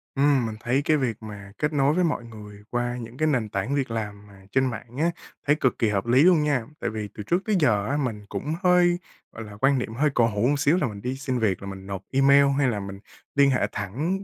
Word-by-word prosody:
Ừm, 140 -3 +3
mình 110 -1 -4
thấy 125 +4 0
cái 155 -1 +3
việc 125 -6 -1
mà 100 -2 -9
kết 150 +1 -1
nối 140 0 +3
với 180 +2 +2
mọi 150 -8 0
người 105 -3 -11
qua 120 0 -2
những 115 +1 -9
cái 155 - +1
nền 120 -8 0
tảng 100 +9 -2
việc 135 -4 -1
làm 105 -2 -5
mà 100 -1 -16
trên 130 0 +2
mạng 120 +2 -8
á, 170 +3 +2 0.4
thấy 150 - +5
cực 130 -4 0
kỳ 115 - +2
hợp 100 -2 -1
lý 125 +5 +4
luôn 175 -4 +5
nha. 140 -6 0
Tại - - -2
vì 105 -2 -5
từ 105 - -7
trước 175 - 0
tới 215 - +1
giờ 105 -9 +2
á 145 +2 0
mình 115 -7 -3
cũng 140 +10 -3
hơi, 180 -1 +4 0.3
gọi 110 - -8
là, 105 -1 -11
quan 135 0 +4
niệm 115 - -4
hơi 145 +6 +2
cổ 115 -3 +3
hủ 105 +2 0
một 145 0 +1
xíu 150 +4 +3
là 150 -8 +1
mình 100 -2 -8
đi 125 +3 -3
xin 130 -2 -2
việc 100 -5 0
là 100 - -7
mình 95 0 -8
nộp 95 -2 -5
email, 140 +1 +5
hay 140 -2 +3
là 110 -4 -1
mình 100 0 -7 0.4
liên 140 -1 +5
hệ 130 - +1
thẳng 150 - -3
125 Hz, 265 wpm, -25 LUFS, 105-145 Hz, 0.4 s, thấy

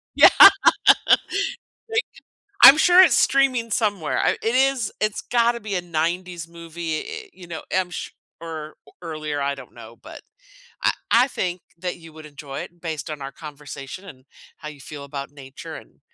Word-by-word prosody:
Yeah. - - +9 1.6
Like, 450 0 0 0.6
I'm 275 - +11
sure 360 +3 +7
it's 325 -10 +4
streaming 260 -4 +2
somewhere. 205 -7 -1
I - - +2
it 225 +2 -1
is 265 -4 +1
it's 215 -1 -1
gotta 235 0 +1
be 205 -2 -5
a 180 - 0
‘90s 170 +1 -3
movie. 170 -1 -6
Eh, 445 -1 -9
you 180 -2 -14
know, 165 -2 -7
I'm 185 -1 0
sure - - -7 0.3
o 155 -2 -7 0.3
earlier; 155 -3 -5
I 140 0 -1
don't 135 -3 -14
know, 115 0 -13
but - - -12 0.6
I - - +4 0.2
I 245 +3 +5
think 180 -8 -4 0.2
that 180 +1 -5
you 165 -2 -15
would 155 0 -12
enjoy 145 -2 -8
it 175 0 -12
based 160 -4 -5
on 150 -2 -7
our 135 0 -6
conversation 150 +2 -10
and 130 -8 -14 0.3
how 150 - -8
you 145 - -13
feel 145 +2 -9
about 140 0 -7
nature 135 -2 -11
and - - -14
170 Hz, 170 wpm, -22 LUFS, 150-215 Hz, 1.6 s, I'm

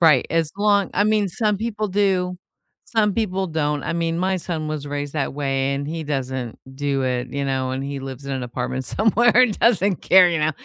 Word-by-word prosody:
Right. 155 -6 +5
As 165 -2 +1
long 205 -1 +2
I 205 - +3
mean, 210 -2 +2
some 210 +1 0
people 215 0 -2
do, 185 -2 +1 0.5
some 215 -4 +1
people 195 -4 -1
don't. 150 -3 -1
I - - -2
mean, 165 0 -1
my 190 +1 +1
son 165 -3 -4
was 150 -2 -4
raised 145 0 -4
that 140 -4 -2
way 135 -1 -1
and 140 +1 -3
he 160 +2 -4
doesn't 130 -5 -4 0.2
do 140 -1 -1
it, 125 0 -1
you 140 0 -2
know, 130 -1 -1
and 135 +1 -3
he 140 -1 -4
lives 135 0 -8
in 140 - -3
an 130 -1 -3
apartment 125 +1 -4
somewhere 225 - +2
and 220 -5 +2
doesn't 200 -5 +3
care, 185 -1 +7
you 170 - 0
know, 155 - +2
160 Hz, 215 wpm, -22 LUFS, 135-195 Hz, 0.5 s, care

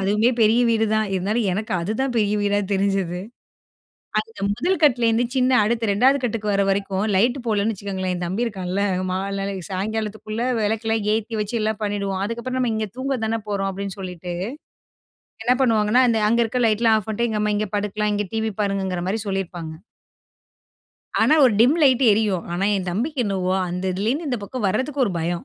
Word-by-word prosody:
அதுவுமே 210 +5 +2
பெரிய 225 +2 +5
வீடு 225 -1 +2
தான். 215 -1 +1
இருந்தாலும் 205 +5 0
எனக்கு 215 +4 -3
அதுதான் 225 +8 -2
பெரிய 210 -2 +2
வீடா 205 0 +1
தெரிஞ்சது. 195 -3 0 1.0
அந்த 225 +1 -12
முதல் 350 - 0
கட்லேருந்து 240 -4 +3
சின்ன 255 -1 +2
அடுத்து 225 0 0
2வது 260 +7 +4
கட்டுக்கு 220 -3 -1
வர்ற 200 0 +2
வரைக்கும் 195 0 -1
லைட் 240 +7 +3
போடலன்னு 215 0 +1
வச்சுக்கோங்களேன்! 190 -2 -3
என் 175 0 -3
தம்பி 195 +7 -1
இருக்கான்ல 190 -2 -2 0.3
மால் 195 +2 -2
நாளை 195 0 -3 0.2
சாயங்காலத்துக்குள்ளே 215 +3 -3
விளக்கெல்லாம் 220 0 0
ஏத்தி 225 +1 -3
வச்சு 210 +3 -2
எல்லாம் 215 0 -1
பண்ணிடுவோம். 200 -2 -2
அதுக்கப்பறம் 235 +4 -3
நம்ம 245 -3 +1
"இங்க 220 -1 -2
தூங்க 265 0 -2
தான 225 +1 -1
போறோம்" 195 -1 -1
அப்பிடின்னு 195 0 -6
சொல்லிட்டு, 180 -1 -6 1.1
என்ன 250 - +3
பண்ணுவாங்கன்னா 225 0 +3
அந்த 230 - +2
அங்க 235 +2 +3
இருக்க 250 +3 -1
லைட்லாம் 220 +1 +3
ஆஃப் 210 - -12
பண்ட்டு, 235 +2 0
எங்க 215 -1 -1
அம்மா 210 0 +1
இங்க 215 +1 -1
படுக்கலாம், 210 +1 -1
இங்க 205 0 -1
டிவி 220 0 -1
பாருங்கங்கிறமாரி 190 0 -1
சொல்லியிருப்பாங்க. 175 -4 -4 1.4
ஆனா 305 - +5
ஒரு 250 - +5
டிம் 255 +7 +5
லைட் 265 -2 +5
எரியும். 205 -5 0
ஆனா 180 +3 -1
என் 185 -2 -3
தம்பிக்கு 250 - -1
என்னவோ, 190 -2 0
அந்த 180 +1 -4
இதுலேருந்து 235 - -1
இந்த 250 -3 -1
பக்கம் 225 +1 -3
வர்றதுக்கு 260 +7 0
ஒரு 195 - -2
பயம். 170 +1 -2
210 Hz, 170 wpm, -22 LUFS, 195-230 Hz, 1.4 s, பெரிய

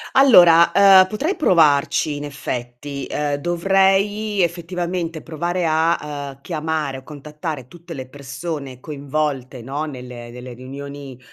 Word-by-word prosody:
Allora, 175 -11 +7
ehm, 190 0 +7
potrei 295 - -2
provarci, 150 - +3
in 145 - -6
effetti. 140 0 -6
Ehm, 145 -1 -1
dovrei, 195 +4 +1
effettivamente, 170 -1 -3
provare 170 +2 -2
a, 155 -3 0
ehm, 140 - -29
chiamare, 155 -3 -3
o 130 - -11
contattare 150 -2 -7
tutte 170 +2 -11
le 130 -1 -7
persone 140 -1 -7
coinvolte, 140 -4 -3
no, 145 +5 -3
nelle 125 -4 -9
nelle 125 +1 -9
riunioni, 135 +1 -9
150 Hz, 120 wpm, -20 LUFS, 140-175 Hz, -, Allora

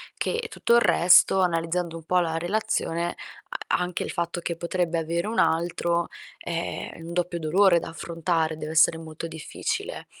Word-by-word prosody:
che 470 0 -2
tutto 235 - +2
il 235 - +6
resto, 180 0 +5
analizzando 170 -1 0
un 165 - -11
po' 180 +3 +2
la 165 -2 -1
relazione, 175 -2 -1 0.3
a - - -1
anche 180 -1 -2
il - - -4
fatto 170 0 -3
che 170 0 -3
potrebbe 170 -1 -1
avere 170 +4 -2
un 225 - -1
altro, 170 +1 +1 0.3
è 170 -1 -4
un 165 +1 -8
doppio 175 0 -1
dolore 175 +3 +4
da - - -7
affrontare, 165 -1 -1
dev'essere 160 +1 +3
molto 160 +1 -7
difficile. 160 -2 -4
170 Hz, 160 wpm, -25 LUFS, 165-180 Hz, 0.3 s, il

